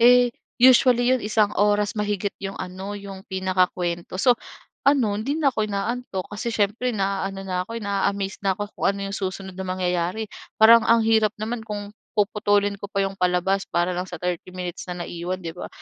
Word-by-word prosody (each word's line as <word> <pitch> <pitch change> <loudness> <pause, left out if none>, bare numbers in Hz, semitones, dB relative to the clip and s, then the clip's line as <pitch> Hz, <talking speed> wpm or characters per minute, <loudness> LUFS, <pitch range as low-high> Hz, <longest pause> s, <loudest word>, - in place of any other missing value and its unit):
Eh, 245 +1 +7 0.3
usually 250 -1 +6
'yon 255 - +2
isang 210 -1 +2
oras 205 0 +2
mahigit 205 -1 -1
yung 195 0 -4
ano, 190 +2 -6
yung 195 -1 -9
pinakakuwento. 185 -2 -1
So, 240 +4 +4 0.5
ano, 220 -7 +2
hindi 280 +7 -1
na 285 -5 +2
ako 215 -1 -1
inaantok 200 -1 -3
kasi 225 +3 -3
siyempre 225 +2 0
naano 195 0 -2
na 185 -1 -2
ako, 230 - -5
naa-amazed 200 -1 -1
na 195 -1 +1
ako 205 0 -5
kung - - -2
ano 200 0 -1
yung - - -2
susunod 190 0 -4
na 190 0 -6
mangyayari. 180 +3 -1 0.3
Parang 230 +1 +8
ang 230 -1 +5
hirap 220 -1 +4
naman 225 +2 -3
kung 205 -1 -6 0.2
puputulin 205 -1 +2
ko 200 - -6
pa 195 -1 0
yung 195 - -2
palabas 180 +2 +1
para 175 +1 +1
lang 180 +1 -3
sa 175 - -6
30 180 +1 -3
minutes 180 -1 -6
na 175 -1 -4
naiwan, 175 +2 -4
'di 165 - -4
ba? 180 - -7
200 Hz, 185 wpm, -24 LUFS, 185-220 Hz, 0.5 s, Parang